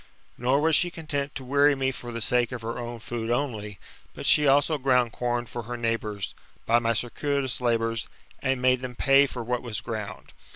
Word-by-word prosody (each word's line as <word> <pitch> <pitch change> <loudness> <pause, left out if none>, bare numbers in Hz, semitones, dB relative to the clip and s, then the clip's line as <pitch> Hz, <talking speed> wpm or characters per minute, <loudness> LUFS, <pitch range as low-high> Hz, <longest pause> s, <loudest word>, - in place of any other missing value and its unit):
Nor 130 +4 +2
was 160 0 +4
she 175 - +3
content 150 -4 -4
to 135 - -5
weary 140 +2 +4
me 135 0 0
for 120 -2 -8
the 115 0 -5
sake 125 +1 +1
of 125 -3 -6
her 115 +2 -4
own 120 0 -5
food 115 0 -4
only, 110 -6 -2 0.4
but - - -7
she 150 -1 +5
also 145 +2 +3
ground 125 -3 +2
com 120 0 -1
for 120 - -6
her 120 +2 -6
neighbours, 115 -4 -2 0.3
by 115 +1 +4
my 115 0 +1
circuitous 130 +3 -1
labours, 115 -1 0 0.3
and 130 -1 0
made 130 0 +3
them 125 -1 -6
pay 140 +2 +5
for 120 -3 -6
what 125 +1 -1
was 115 -4 -4
ground. 110 -3 -6
125 Hz, 200 wpm, -26 LUFS, 115-135 Hz, 0.4 s, she